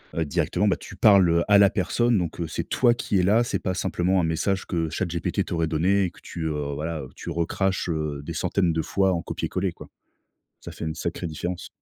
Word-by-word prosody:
heu, 80 - +1
directement, 90 +6 0
bah, 100 - +3
tu - - -11
parles, 100 -2 +6
heu, 85 0 +3
à 100 -1 +6
la 100 -1 +6
personne 110 +4 +1
donc 85 -2 -4
heu, 85 - -1
c'est - - -4
toi 120 -2 +4
qui 110 -4 -1
est - - +2
là 105 +6 +4
c'est 120 - -1
pas 95 - -2
simplement 95 0 0
un - - +1
message 85 +4 0
que 85 -3 -1
ChatGPT 85 0 -1
t'aurait 85 -1 -1
donné 90 +5 +2
et 90 - -1
que - - -18
tu, 85 - -6
heu, 75 -2 -3
voilà, 80 +1 -3
heu, 65 - -9
tu - - -6
recraches, 90 +2 -1
heu, 75 -3 -2
des - - -5
centaines 90 -4 +1
de 80 - 0
fois 95 +4 +1
en 85 - -2
copier - - -4
coller, 95 0 -1
quoi. - - -12 0.7
Ça - - -9
fait - - -7
une 80 -1 -3
sacrée 85 +2 -4
différence. 85 +3 -5
90 Hz, 240 wpm, -25 LUFS, 80-95 Hz, 0.7 s, parles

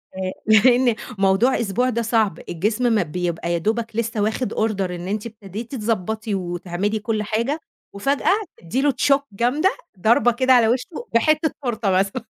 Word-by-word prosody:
آآ 190 0 -3
لإن 240 +2 +5 0.2
موضوع 195 +7 +3
أسبوع 235 +3 0
ده 235 -1 -1
صعب، 220 -6 +1
الجسم 215 +8 0
ما 210 - +3
بيبقى 170 +1 -3
يا - - +1
دوبك 220 +5 -2
لسه 225 -1 -1
واخد 220 +2 -1
order 200 -4 -1
إن 175 0 -6
أنتِ 210 +2 -3
ابتديتِ 220 +2 -7
تضبّطي 220 -1 -2
وتعملي 180 +3 -2
كُل 215 0 -2
حاجة، 230 +8 -1 0.3
وفجأة 275 - +1 0.3
تدّي 230 +11 -2
له 290 - +3
shock 275 +2 +2
جامدة، 250 - +1 0.2
ضربة 240 +5 +4
كده 255 +2 +3
على 240 -3 +5
وشه 260 - -2
بحِتّة 310 +6 +3
تورتة 230 -5 -1
مثلًا، 195 +6 0
220 Hz, 160 wpm, -22 LUFS, 195-245 Hz, 0.3 s, لإن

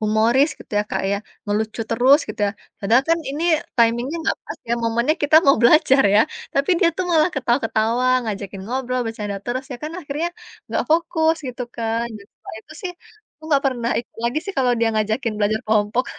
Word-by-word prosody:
humoris 220 +6 +3
gitu, - - -15
ya, - - +2
Kak, - - -1
ya, - - +1 0.3
ngelucu 215 +2 -2
terus 255 +5 +5
gitu, - - -7
ya. - - 0 0.3
Padahal 225 +6 +3
kan 330 - +4
ini 295 +4 -4 0.3
timing-nya 240 +5 +2
enggak 320 - 0
pas, - - -8
ya, 235 - +3
momennya 235 +6 +1
kita 295 +2 +5
mau 275 - +6
belajar 270 +1 +5
ya, 210 - +7 0.3
tapi 275 +5 +1
dia 345 - +5
tuh 370 - -1
malah 315 +1 +4
ketawa-ketawa, 240 -2 +1 0.2
ngajakin 200 -2 -5
ngobrol, 255 +1 -2
bercanda 210 -3 -4
terus, 255 +2 -2
ya, - - -5
kan 305 +1 -5
akhirnya 300 +2 -3 0.4
enggak - - -1
fokus 320 0 +2
gitu 250 0 -5
kan. 230 0 -1
Dan, 200 - -16
setelah - - -11
itu 310 - -15
sih 360 - -4 0.5
aku 315 - -16
enggak 285 -3 +2
pernah 240 -2 -3
ikut 235 - -21
lagi 240 +6 +1
sih 395 - -5
kalau 250 -2 +3
dia 230 0 +2
ngajakin 220 +2 0
belajar 215 +1 +1
kelompok. 215 +3 +1
245 Hz, 195 wpm, -21 LUFS, 220-285 Hz, 0.5 s, ya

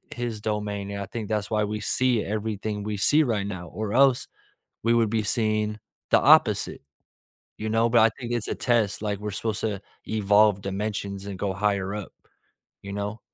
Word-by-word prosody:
"His 120 -3 -3
domain," 105 -2 -3
and 100 0 -4
I 100 - -3
think 110 -1 -5
that's 105 -1 -2
why 105 -1 +2
we 105 +1 -4
see 125 0 +2
everything 105 0 -3
we 105 0 -3
see 150 +10 +5
right 110 -7 -1
now 90 -3 -6
or 105 +2 -4
else 135 -1 +4 0.6
we 115 - +4
would 115 -2 +2
be 110 0 +1
seeing 110 -1 +1 0.3
the - - +5
opposite, - - +4 0.8
you 110 - -4
know? 115 +1 +2
But 115 -1 +5
I 115 - +6
think 120 -1 -5
it's 120 -3 -1
a - - -1
test. 115 -6 +1
Like, 105 -2 -2
we're 105 0 -4
supposed 110 +1 -2
to 100 -3 -2 0.3
evolve 105 -1 +3
dimensions 100 0 -4
and 95 -2 -6
go 100 -2 -1
higher 100 -1 0
up. 105 -3 -7 0.7
You 100 0 -6
know? 105 +2 -4
105 Hz, 190 wpm, -25 LUFS, 100-110 Hz, 0.8 s, I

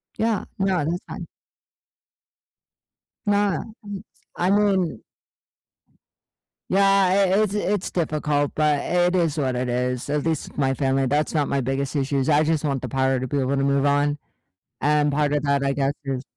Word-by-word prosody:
Yeah, 220 -3 0
no, 195 -1 +1
that's 170 +3 -1
fine. - - -7 2.0
Nah, 205 -1 +2 0.2
I'm 205 -2 -7 0.3
I 180 - +1
mean 195 - +2 1.7
Yeah, 195 +2 +3
i 195 -1 +4 0.3
it's 205 -2 -2
it's 205 -1 -1
difficult, 150 -3 0
but 150 -2 +2
it 180 +1 +1
is 165 -4 +1
what 130 -4 0
it 125 0 -2
is. 125 +2 -2
At 150 0 -1
least 160 -3 -3
my 135 -2 +1
family 135 0 +1
that's 145 +3 0
not 150 -3 +1
my 140 - 0
biggest 135 +3 -2
issues. 135 -1 0
I 150 0 +4
just 160 -1 0
want 135 -3 -1
the - - -5
power 130 -1 +1
to 130 - -3
be 140 +3 -1
able 135 +1 0
to 135 - 0
move 140 0 +2
on, 145 +1 +2 0.6
and 150 0 +2
part 145 0 +1
of 145 -1 0
that, 140 -1 +1
I 140 0 +1
guess, 140 0 0
is 135 -2 -3
145 Hz, 170 wpm, -23 LUFS, 135-175 Hz, 2.0 s, i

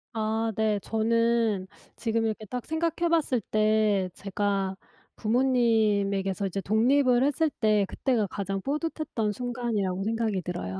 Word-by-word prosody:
아 220 +1 0
네. 215 -1 +1
저는 225 -3 +1 0.3
지금 225 -1 -1
이렇게 220 -1 -3
딱 245 +3 -5
생각해 335 +1 0
봤을 300 -8 +1
때 215 -2 +2
제가 195 -1 -2 0.4
부모님에게서 215 -5 +1
이제 195 +1 -3
독립을 245 +5 +3
했을 300 +3 +2
때 215 -6 +2
그때가 240 -6 0
가장 195 0 -4
뿌듯했던 295 - -2
순간이라고 220 -5 -2
생각이 220 -3 -1
들어요. 95 - -4
220 Hz, 290 characters per minute, -27 LUFS, 200-245 Hz, 0.4 s, 독립을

